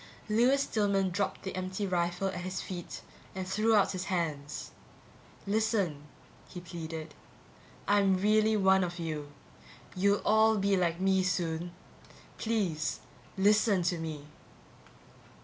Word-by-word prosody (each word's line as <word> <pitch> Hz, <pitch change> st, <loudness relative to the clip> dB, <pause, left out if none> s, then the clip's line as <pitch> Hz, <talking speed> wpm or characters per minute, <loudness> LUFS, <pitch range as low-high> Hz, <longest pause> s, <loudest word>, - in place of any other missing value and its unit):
Lewis 250 Hz, +6 st, +3 dB
Stillman 200 Hz, -5 st, +1 dB
dropped 200 Hz, +3 st, -2 dB
the 190 Hz, -, -5 dB
empty 185 Hz, +2 st, -3 dB
rifle 180 Hz, +1 st, 0 dB
at 180 Hz, -1 st, -5 dB
his 185 Hz, +1 st, -4 dB
feet 175 Hz, -2 st, -7 dB, 0.3 s
and 190 Hz, -1 st, -4 dB
threw 215 Hz, +3 st, +2 dB
out 205 Hz, -, +4 dB
his 185 Hz, 0 st, -4 dB
hands. 155 Hz, -6 st, -3 dB, 0.7 s
"Listen," 200 Hz, -8 st, 0 dB, 0.4 s
he 180 Hz, -, -7 dB
pleaded, 165 Hz, -3 st, -7 dB, 0.7 s
"I'm 200 Hz, -2 st, +4 dB
really 215 Hz, +2 st, +3 dB
one 190 Hz, -1 st, +4 dB
of 175 Hz, -1 st, -4 dB
you. 155 Hz, -4 st, -4 dB, 0.6 s
You'll 200 Hz, +2 st, +2 dB
all 220 Hz, 0 st, +4 dB
be 200 Hz, 0 st, +2 dB
like 170 Hz, -2 st, 0 dB
me 190 Hz, 0 st, +3 dB
soon. 175 Hz, -2 st, -1 dB, 0.7 s
Please, 190 Hz, -9 st, -1 dB, 0.4 s
listen 205 Hz, -1 st, +3 dB
to 175 Hz, 0 st, 0 dB
me." 155 Hz, -3 st, -5 dB
190 Hz, 125 wpm, -30 LUFS, 170-205 Hz, 0.7 s, out